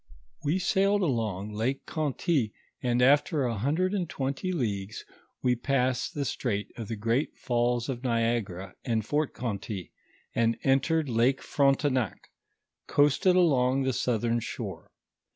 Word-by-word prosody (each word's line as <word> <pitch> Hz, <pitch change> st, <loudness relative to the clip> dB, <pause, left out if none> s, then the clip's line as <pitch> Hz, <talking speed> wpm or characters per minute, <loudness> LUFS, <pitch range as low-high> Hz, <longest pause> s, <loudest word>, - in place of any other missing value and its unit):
We 150 Hz, +5 st, +1 dB
sailed 195 Hz, +2 st, +2 dB
along 110 Hz, -, -1 dB
Lake 120 Hz, +6 st, -1 dB
Conty, 145 Hz, -5 st, 0 dB, 0.3 s
and 125 Hz, 0 st, +2 dB
after 145 Hz, +3 st, +4 dB
a 120 Hz, -2 st, 0 dB
hundred 155 Hz, -, 0 dB
and 180 Hz, -5 st, -1 dB
twenty 135 Hz, +7 st, -2 dB
leagues 105 Hz, -, -3 dB, 0.4 s
wo 125 Hz, -1 st, +3 dB
passed 130 Hz, 0 st, 0 dB
tho 145 Hz, -, -1 dB
strait 105 Hz, -6 st, -2 dB
of 115 Hz, -3 st, -6 dB
tho 115 Hz, -, -3 dB
great 115 Hz, +7 st, 0 dB
falls 120 Hz, 0 st, 0 dB
of 125 Hz, -3 st, -3 dB
Niag 115 Hz, -3 st, +1 dB
ara 90 Hz, +1 st, -8 dB
and 115 Hz, -4 st, 0 dB
Fort 150 Hz, +4 st, -1 dB
Conty, 100 Hz, -5 st, -4 dB, 0.4 s
and 115 Hz, 0 st, +2 dB
entering 145 Hz, +4 st, +2 dB
Lake 125 Hz, +1 st, +2 dB
Frontcnac, 135 Hz, -, +1 dB, 0.6 s
coasted 145 Hz, +6 st, +4 dB
along 135 Hz, -7 st, +3 dB
the 130 Hz, 0 st, 0 dB
southern 120 Hz, -1 st, 0 dB
shore. -, -, -6 dB
125 Hz, 135 wpm, -28 LUFS, 115-145 Hz, 0.6 s, after